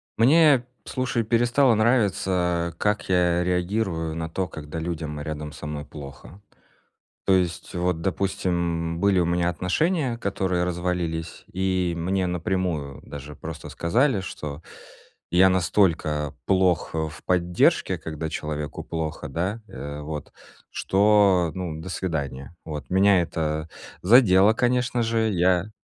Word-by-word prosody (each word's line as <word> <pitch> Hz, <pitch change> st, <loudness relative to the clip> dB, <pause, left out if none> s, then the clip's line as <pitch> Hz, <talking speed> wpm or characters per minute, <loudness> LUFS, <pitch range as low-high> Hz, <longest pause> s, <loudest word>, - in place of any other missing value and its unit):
Мне, 145 Hz, +3 st, +6 dB, 0.2 s
п -, -, -11 dB
слушай, 130 Hz, -2 st, -1 dB
перестало 120 Hz, +2 st, +3 dB
нравиться, 95 Hz, -7 st, +1 dB
как 105 Hz, 0 st, 0 dB
я 90 Hz, -1 st, +3 dB
реагирую 90 Hz, -2 st, -1 dB
на 80 Hz, 0 st, -4 dB
то, 95 Hz, +3 st, -2 dB
когда 80 Hz, 0 st, -7 dB
людям 80 Hz, -3 st, -4 dB
рядом 75 Hz, 0 st, -5 dB
со 75 Hz, -, -8 dB
мной 75 Hz, -1 st, -5 dB
плохо. 70 Hz, +6 st, -11 dB, 0.9 s
То 95 Hz, -, +5 dB
есть, 90 Hz, -1 st, -1 dB
вот 90 Hz, -1 st, 0 dB
допустим, 85 Hz, -3 st, -1 dB
были 100 Hz, -1 st, +3 dB
у -, -, +2 dB
меня 85 Hz, 0 st, +1 dB
отношения, 125 Hz, -, 0 dB
которые 95 Hz, -4 st, -1 dB
развалились. 85 Hz, -2 st, -3 dB
И 95 Hz, -2 st, 0 dB
мне 95 Hz, +3 st, 0 dB
напрямую 90 Hz, -5 st, -2 dB
даже 75 Hz, +1 st, -9 dB
просто 80 Hz, +1 st, -8 dB
сказали, 120 Hz, +6 st, +1 dB
что 75 Hz, -4 st, -7 dB, 0.7 s
я 90 Hz, +2 st, +6 dB
настолько 85 Hz, -5 st, +1 dB
плох, 95 Hz, -3 st, +2 dB
э, -, -, -1 dB
в 80 Hz, -, -12 dB
поддержке, 90 Hz, -1 st, +2 dB
когда 80 Hz, 0 st, -5 dB
человеку 75 Hz, -1 st, -4 dB
плохо, 80 Hz, -2 st, -4 dB
да, 100 Hz, +7 st, -3 dB
э, 70 Hz, +1 st, -7 dB
вот, 75 Hz, -1 st, -6 dB, 0.4 s
что, 100 Hz, -4 st, +3 dB
ну, 85 Hz, -4 st, -4 dB
до 85 Hz, -, -7 dB
свидания. 80 Hz, -4 st, -4 dB
Вот. 75 Hz, -3 st, -7 dB
Меня 95 Hz, -1 st, +5 dB
это 80 Hz, -1 st, -2 dB, 0.3 s
задело, 100 Hz, -1 st, +6 dB
конечно 125 Hz, 0 st, +1 dB
же. 115 Hz, -1 st, +1 dB
Я 90 Hz, +2 st, +2 dB
90 Hz, 130 wpm, -24 LUFS, 80-100 Hz, 0.9 s, Мне